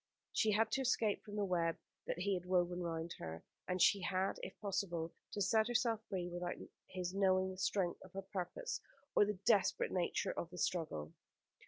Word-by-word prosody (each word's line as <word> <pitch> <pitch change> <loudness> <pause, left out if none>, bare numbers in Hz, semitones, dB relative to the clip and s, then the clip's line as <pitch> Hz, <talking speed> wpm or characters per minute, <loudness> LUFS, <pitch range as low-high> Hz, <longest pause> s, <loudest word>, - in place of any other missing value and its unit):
She 215 -1 +3
had 220 +1 +3
to 270 - +2
escape 230 -5 +2
from 205 -1 -8
the 205 -1 +1
web 170 -3 +1 0.3
that - - -1
he 195 +3 +1
had 180 -1 -3
woven 180 -1 +2
round 165 -1 -2
her; 80 0 -6 0.2
and 180 0 0
she 200 +3 +6
had, 190 +1 0
if - - -7
possible, 175 -5 -1 0.2
to 205 - -2
set 220 +1 +4
herself 235 -2 +2
free 180 -2 -1
without 175 0 -3 0.3
his 180 -1 -3
knowing 190 -1 +3
the 185 - -8
strength 190 -2 0
of 185 - -13
her 195 0 -4
purpose, 200 - -3 0.3
or - - +7
the 210 -1 -2
desperate 200 - +4
nature 180 -2 0
of 170 - -4
the 180 - -10
struggle. 155 - -1
185 Hz, 190 wpm, -38 LUFS, 175-205 Hz, 0.3 s, or